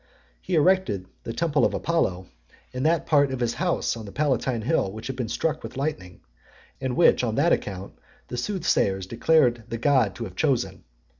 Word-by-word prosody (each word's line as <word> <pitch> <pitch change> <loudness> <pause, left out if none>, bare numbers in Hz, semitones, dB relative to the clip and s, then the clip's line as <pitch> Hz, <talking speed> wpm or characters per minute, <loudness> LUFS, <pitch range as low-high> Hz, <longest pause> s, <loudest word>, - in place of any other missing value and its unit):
He - - -2
erected 155 - +2 0.2
the - - -3
temple 150 +3 +1
of - - +2
Apollo 95 - 0 0.5
in 125 - -3
that 160 +3 +2
part 145 -3 +3
of 130 - -3
his 120 -1 0
house 175 -7 0
on 115 -2 -8
the - - -8
Palatine 130 -4 0
hill 125 -7 +1
which 110 +2 -9
had 135 - -4
been 125 -4 -3
struck 155 +5 -1
with - - -8
lightning, 135 - -4 0.6
and 130 -2 -2
which, 170 - +5
on 115 -3 -1
that 155 +5 +3
account, 95 -1 -4 0.3
the - - -6
soothsayers 120 - 0
declared 120 +1 +2
the 115 - -3
God 120 -6 +2
to 120 - -5
have 95 -5 -8
chosen. 105 - -1
125 Hz, 190 wpm, -25 LUFS, 110-155 Hz, 0.6 s, which